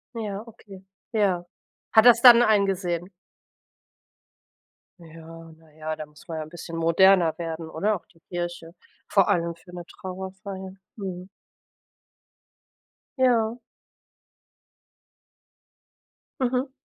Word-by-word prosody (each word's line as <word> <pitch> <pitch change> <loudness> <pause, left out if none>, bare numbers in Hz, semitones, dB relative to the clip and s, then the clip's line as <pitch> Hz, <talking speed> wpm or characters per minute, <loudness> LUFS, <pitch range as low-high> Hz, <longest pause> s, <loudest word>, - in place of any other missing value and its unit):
Ja. 210 -2 -4
Okay. 200 -4 -14 0.3
Ja. 190 -5 +1 0.5
Hat 220 0 +7
er 245 - +11
es 235 0 -2
dann 240 -1 +9
eingesehen? 195 -5 +1 1.9
Ja. 165 0 -13
Na 160 -1 -23
ja, 155 0 -5
da 155 - -7
muss 150 0 -20
man 165 -1 -5
ja 155 - -3
'n 155 - -12
bisschen 165 0 -8
moderner 170 +1 +4
werden, 165 -1 -5
oder? 205 +7 0
Auch 180 - -10
die 165 - -26
Kirche, 175 -1 -6 0.3
vor 195 -3 +3
allem 170 -1 0
für 175 +1 -17
'ne 175 -1 -8
Trauerfeier. 190 +1 -8 0.2
Mhm. 185 -3 -6 1.9
Ja. 235 -3 +2 2.8
Mhm. 255 +1 0
180 Hz, 110 wpm, -25 LUFS, 165-205 Hz, 2.8 s, er